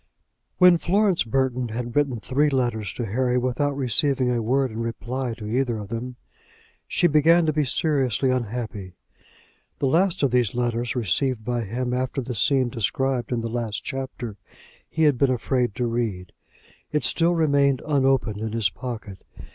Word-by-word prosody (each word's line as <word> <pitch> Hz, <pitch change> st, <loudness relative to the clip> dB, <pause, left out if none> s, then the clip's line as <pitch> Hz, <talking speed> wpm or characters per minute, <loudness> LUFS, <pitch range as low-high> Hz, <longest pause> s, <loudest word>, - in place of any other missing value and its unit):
When 180 Hz, -2 st, +6 dB
Florence 195 Hz, +1 st, +2 dB
Burton 125 Hz, +1 st, 0 dB
had 120 Hz, +1 st, -5 dB
written 140 Hz, -5 st, +1 dB
three 140 Hz, +6 st, +1 dB
letters 120 Hz, -6 st, -1 dB
to 120 Hz, -, -4 dB
Harry 125 Hz, +4 st, 0 dB
without 130 Hz, +3 st, -1 dB
receiving 130 Hz, 0 st, +1 dB
a 120 Hz, -1 st, 0 dB
word 130 Hz, +3 st, +1 dB
in 110 Hz, -, -6 dB
reply 120 Hz, +1 st, -3 dB
to 110 Hz, -, -9 dB
either 120 Hz, +1 st, 0 dB
of 105 Hz, -2 st, -7 dB
them, 120 Hz, +2 st, -5 dB, 0.7 s
she -, -, 0 dB
began 165 Hz, +2 st, +5 dB
to 155 Hz, -, +1 dB
be 150 Hz, -1 st, +1 dB
seriously 135 Hz, -3 st, +1 dB
unhappy. 110 Hz, -6 st, -4 dB, 0.8 s
The -, -, -1 dB
last 170 Hz, +5 st, +2 dB
of 135 Hz, -, +3 dB
these 125 Hz, -3 st, +1 dB
letters, 120 Hz, 0 st, -1 dB
received 120 Hz, +1 st, 0 dB
by 120 Hz, -1 st, -1 dB
him 125 Hz, +4 st, -3 dB
after 130 Hz, +2 st, -2 dB
the 125 Hz, -1 st, -4 dB
scene 125 Hz, +4 st, +2 dB
described 130 Hz, +2 st, -1 dB
in 120 Hz, -2 st, 0 dB
the 115 Hz, 0 st, -4 dB
last 115 Hz, -2 st, -3 dB
chapter, 130 Hz, -5 st, -5 dB, 0.5 s
he 160 Hz, -, 0 dB
had 145 Hz, -5 st, +3 dB
been 140 Hz, -, +3 dB
afraid 125 Hz, -2 st, 0 dB
to 125 Hz, -, -1 dB
read. 115 Hz, -7 st, -2 dB, 0.6 s
It 150 Hz, -, 0 dB
still 170 Hz, +1 st, +2 dB
remained 140 Hz, -4 st, +2 dB
unopened 135 Hz, -7 st, +1 dB
in 110 Hz, +1 st, -4 dB
his 110 Hz, -3 st, +1 dB
pocket. 115 Hz, -6 st, -7 dB
125 Hz, 165 wpm, -24 LUFS, 115-140 Hz, 0.8 s, When